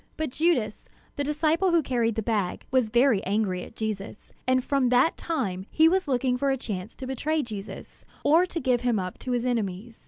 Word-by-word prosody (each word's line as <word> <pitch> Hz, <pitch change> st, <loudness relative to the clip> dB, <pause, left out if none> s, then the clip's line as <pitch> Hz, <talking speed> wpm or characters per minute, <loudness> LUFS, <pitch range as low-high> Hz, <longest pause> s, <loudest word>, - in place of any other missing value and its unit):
But 315 Hz, -4 st, -2 dB
Judas, 255 Hz, -9 st, 0 dB, 0.3 s
the 285 Hz, -, -1 dB
disciple 310 Hz, +5 st, +1 dB
who 340 Hz, -2 st, +3 dB
carried 235 Hz, -4 st, 0 dB
the 220 Hz, -, -2 dB
bag, 205 Hz, -5 st, -1 dB
was 255 Hz, -4 st, +2 dB
very 240 Hz, -2 st, +3 dB
angry 195 Hz, -2 st, 0 dB
at -, -, -11 dB
Jesus; 215 Hz, -2 st, -5 dB, 0.2 s
and 255 Hz, 0 st, +3 dB
from 275 Hz, -3 st, +1 dB
that 250 Hz, +6 st, +4 dB
time 200 Hz, -, -3 dB
he 320 Hz, 0 st, +5 dB
was 370 Hz, +1 st, +2 dB
looking 255 Hz, -1 st, +1 dB
for 280 Hz, -, +1 dB
a 270 Hz, -, +1 dB
chance 205 Hz, -4 st, -5 dB
to 265 Hz, -, -7 dB
betray 295 Hz, +4 st, -1 dB
Jesus, 210 Hz, -4 st, -8 dB, 0.2 s
or 330 Hz, +5 st, +4 dB
to 340 Hz, -, -3 dB
give 250 Hz, -4 st, +1 dB
him 245 Hz, -3 st, +1 dB
up 185 Hz, -2 st, -4 dB
to -, -, -7 dB
his 245 Hz, 0 st, 0 dB
enemies. 225 Hz, -2 st, -2 dB
250 Hz, 205 wpm, -26 LUFS, 215-285 Hz, 0.3 s, he